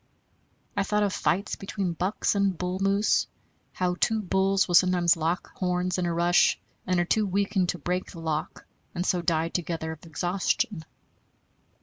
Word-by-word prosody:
I - - +1
thought 210 +1 +1
of 200 -2 0
fights 195 +2 0
between 195 -2 -3
bucks, 185 +5 0
and 200 -3 +1
bull 180 +2 -3
moose, 200 +2 +2 0.5
how 180 -1 0
two 220 0 +2
bulls 195 0 +1
will 175 - -3
sometimes 175 -1 +5
lock 165 +2 -2
horns 180 0 -1
in 175 - 0
a - - 0
rush, 175 +1 +3 0.3
and 185 -1 +2
are 175 - +2
too 215 +4 +1
weakened 195 -1 0
to 180 - -1
break 180 +4 -2
the 170 - -10
lock, 160 -2 -3 0.3
and 175 +1 -1
so 180 -2 +1
die 165 -1 +1
together 165 -2 -3
of 160 -2 -10
exhaustion. 175 +1 -1
180 Hz, 165 wpm, -27 LUFS, 170-195 Hz, 0.5 s, sometimes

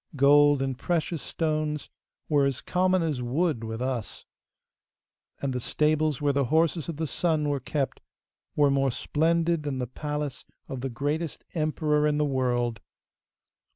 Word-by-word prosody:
Gold 145 0 +5
and 135 -1 -2
precious 165 +2 -1
stones 155 -2 -2 0.4
were 145 -3 +3
as 135 -2 -2
common 185 0 +1
as 150 -6 -1
wood 130 +1 0
with 110 +2 -4
us, 125 -5 -4 1.1
and 140 -2 -2
the 125 - -1
stables 155 +2 +1
where 145 -1 +1
the 140 -1 +2
horses 160 +3 +1
of 160 - -4
the 160 - -1
sun 155 0 0
were 145 -1 0
kept 135 +1 -2 0.6
were 145 -1 +4
more 135 0 +2
splendid 165 +5 +1
than 145 -3 -3
the 125 - -1
palace 145 0 -4 0.2
of 130 -2 -5
the 135 - -2
greatest 145 +6 -3
emperor 155 -1 +1
in 150 -1 +1
the 150 - +2
world. 120 -5 0
145 Hz, 155 wpm, -27 LUFS, 130-155 Hz, 1.1 s, Gold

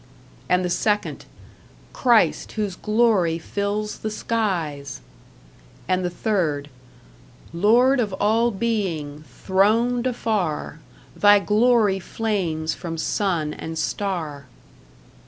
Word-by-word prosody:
And 180 0 +2
the - - -1
second 210 +3 -1 0.7
Christ, 240 -4 +2
whose 205 -4 -2
glory 210 -6 +2
fills 205 +4 -3
the 215 - -3
skies 170 - -2 0.9
And 185 0 +1
the 180 - 0
third 165 -7 -1 0.8
Lord 240 +9 +4
of 215 -4 0
all 220 +4 +2
being, 190 -10 -2 0.2
throned 230 +6 +2
afar, 200 - -2 0.4
Thy 205 0 +6
glory 210 -1 +3
flames 175 -7 -2
from 165 -2 -6
sun 160 -3 -1
and 160 0 -7
star. 160 -7 -3
200 Hz, 100 wpm, -23 LUFS, 165-220 Hz, 0.9 s, Thy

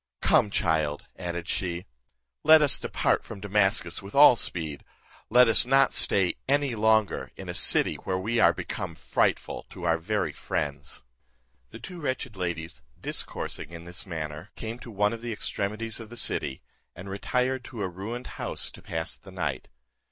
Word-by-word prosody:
Come, - - +4
my - - -10
child," 80 -6 0
added 85 -2 -4
she, 90 -1 -2 0.6
"let 155 0 +8
us 145 - +4
depart - - +1
from 110 - -9
Damascus 95 -3 +1
with 100 +4 -10
all 140 -3 +9
speed; 80 -9 -1 0.5
let 125 +2 +7
us 115 - +7
not 135 +2 +4
stay 95 -3 +3
any 140 -2 +2
longer 110 -1 +2
in - - -9
a - - -3
city - - +3
where 95 - -2
we 110 +5 0
are - - +7
become 85 - -5
frightful - - -1
to 90 - -10
our 85 -1 +2
very 80 - -1
friends." 70 0 -3 0.7
The - - -10
two 175 +8 -9
wretched 130 -5 -3
ladies, 85 -6 -4 0.2
discoursing - - -3
in 85 -1 -9
this 90 +3 -5
manner, 80 +1 -5
came 115 +1 -6
to 125 - -10
one 105 0 +1
of 115 - -6
the 120 0 -4
extremities 110 +1 -3
of 115 -2 -9
the 120 - -9
city, 65 - 0 0.3
and 95 +3 -9
retired 125 +6 -1
to 115 -6 -5
a - - 0
ruined 105 +8 -6 0.2
house - - -3
to - - -13
pass 80 +1 -3
the 100 - -15
night. 80 -8 -3
100 Hz, 175 wpm, -27 LUFS, 85-115 Hz, 0.7 s, all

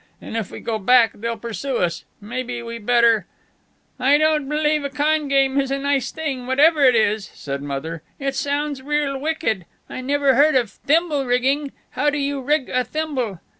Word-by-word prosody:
"And - - -8
if 225 -4 -2
we - - -8
go 225 -2 -2
back 235 +1 +5
they'll 230 +2 -4
pursue 235 +4 -4
us. 170 -1 -1
Maybe 240 +2 -5
we 230 0 -6
better 230 -2 +3 0.4
" - - -42
"I 290 - +7
don't 305 -2 +1
believe 300 0 +1
a 280 - -2
con 300 +1 0
game 275 0 +2
is 270 - -4
a 275 - 0
nice 275 -2 0
thing, 275 -6 -4
whatever 295 +3 +4
it 255 -2 +6
is," 215 -2 +1
said 140 -1 -5
Mother. 145 +3 -5 0.2
"It 275 -1 -2
sounds 285 0 -2
real 290 0 -1
wicked. 280 - -1 0.2
I - - -6
never 280 +1 +2
heard 300 +2 +4
of 240 -6 +2
thimble 300 - 0
rigging. 270 +4 +1 0.2
How 295 +3 +1
do 290 - -2
you 280 -1 -2
rig 290 0 +1
a 255 0 +1
thimble?" 255 - -3
270 Hz, 190 wpm, -21 LUFS, 230-290 Hz, 0.4 s, I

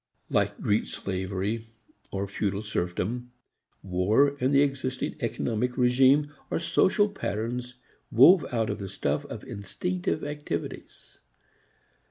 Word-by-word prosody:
Like - - +1
Greek 105 +1 +1
slavery 95 +4 -3 0.4
or 100 +1 -3
feudal 100 +1 -2
serfdom, 105 +5 -2 0.5
war 105 +10 +3
and 130 +2 +2
the 140 0 +6
existing 130 -2 -2
economic 120 0 -1
regime 135 +4 +4 0.2
are - - 0
social 195 +4 +3
patterns 125 - -4 0.4
woven 155 - +7
out 115 -3 0
of - - -4
the 100 -1 -5
stuff - - -1
of - - -8
instinctive 180 - -3
activities. 145 - -6
120 Hz, 115 wpm, -27 LUFS, 100-140 Hz, 0.5 s, woven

